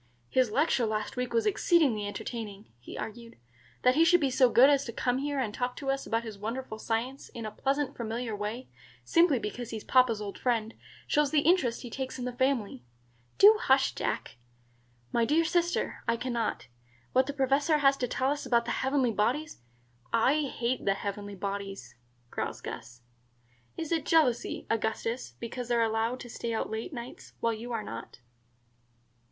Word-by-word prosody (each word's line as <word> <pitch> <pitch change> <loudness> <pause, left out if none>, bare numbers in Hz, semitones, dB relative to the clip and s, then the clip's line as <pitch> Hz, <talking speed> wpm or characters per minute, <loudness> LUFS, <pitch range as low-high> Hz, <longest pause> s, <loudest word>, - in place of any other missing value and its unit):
"His 255 -3 +3
lecture 265 -1 +2
last 215 +2 -2
week 250 -1 -2
was 455 -1 +1
exceedingly 320 - +3
entertaining," 210 -1 -6
he 120 - -9
argued. 230 +1 -7 0.5
"That 250 - +6
he 315 +5 +5
should 355 +2 +5
be 275 -3 +1
so 255 0 +5
good 245 +3 +7
as 280 -1 +4
to 235 - -5
come 245 +2 0
here 285 +1 -2
and 220 -5 -1
talk 250 +2 -2
to 270 -1 -2
us 275 0 -3
about 230 +1 0
his 215 -3 -8
wonderful 225 +1 -4
science 240 +5 -3
in 230 -2 -7
a 215 - -4
pleasant 275 +5 -1
familiar 230 -1 -3
way, 210 +5 -4 0.4
simply 335 -5 +4
because 235 +2 -5
he's 220 -2 -5
papa's 250 -4 +4
old 205 -2 -6
friend, 225 -3 0 0.3
shows 295 -1 +2
the 300 -1 +3
interest 285 -8 +2
he 240 - -8
takes 265 +1 -4
in 250 - -4
the 250 - -2
family." 245 - 0 0.5
"Do 425 +2 +8
hush, 265 0 +3
Jack." - - -3 0.7
"My 235 - +2
dear 310 +7 +3
sister, 345 +1 0
I 230 0 +2
can 250 +1 -3
not. 230 -2 -1 0.5
What 260 +1 +4
the - - -1
Professor 280 +3 +2
has 275 -2 +4
to 250 - -1
tell 260 +3 0
us 290 - -2
about 235 -2 +2
the - - -2
heavenly 265 -2 +1
bodies 245 - -1 0.3
" 120 +2 -34 0.2
"I 305 -1 +1
hate 245 +1 -1
the 195 - +2
heavenly 200 0 -5
bodies," 195 -7 -5 0.4
growls - - -3
Gus. 120 +1 -8 0.8
"Is 325 -1 -4
it 330 -2 0
jealousy, 295 -8 +2
Augustus, 225 - -2
because 245 +1 -5
they 240 - +1
are 230 - +3
allowed 225 +3 0
to - - -8
stay 230 0 -4
out - - -2
late 220 +9 -4
nights, 240 -2 -9
while 230 0 +1
you 230 +3 -7
are 225 -2 -2
not?" 115 - -8
245 Hz, 185 wpm, -29 LUFS, 220-275 Hz, 0.8 s, Do